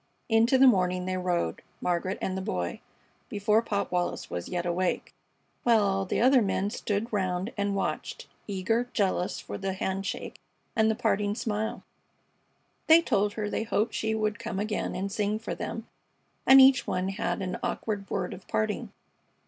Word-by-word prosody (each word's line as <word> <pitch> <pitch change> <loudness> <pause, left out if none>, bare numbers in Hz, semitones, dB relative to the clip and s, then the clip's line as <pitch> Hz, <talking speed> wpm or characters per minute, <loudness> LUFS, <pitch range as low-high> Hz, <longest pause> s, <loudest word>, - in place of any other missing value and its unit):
Into 230 +3 +4
the 265 - +7
morning 185 -6 +3
they 185 0 -1
rode, 180 -2 -1 0.2
Margaret 180 +2 -1
and 190 - -1
the 190 - -2
Boy, 90 - -3 0.5
before 210 +2 +2
Pop 200 -3 -2
Wallis 180 -1 -2
was 85 0 -4
yet 175 -1 -2
awake, 175 +1 -1 0.5
while 230 -3 +4
all 195 -1 +1
the - - -1
other 255 +2 +5
men 200 0 0
stood 215 +3 -2
round 185 +2 -1
and 200 -1 -1
watched, 195 - -3 0.2
eager, 220 +5 0
jealous 190 -2 0
for - - -7
the 195 -1 -2
handshake 190 +1 -3 0.4
and 220 -1 +4
the 220 - +1
parting 210 -3 0
smile. 215 -1 -2 1.0
They 325 +1 +7
told 205 -5 +1
her 210 -1 -3
they 205 - -2
hoped 225 0 0
she 220 0 -1
would 215 -1 -1
come 230 -4 -4
again 210 +1 -2
and 195 +1 -3
sing 210 +1 0
for 225 - -5
them, 225 - -5 0.6
and 265 0 +10
each 265 -1 +6
one 185 +1 -1
had 200 0 -2
an 185 0 -3
awkward 205 -3 -3
word 180 -2 -2
of 185 - -12
parting. 215 -1 -1
205 Hz, 170 wpm, -28 LUFS, 185-220 Hz, 1.0 s, and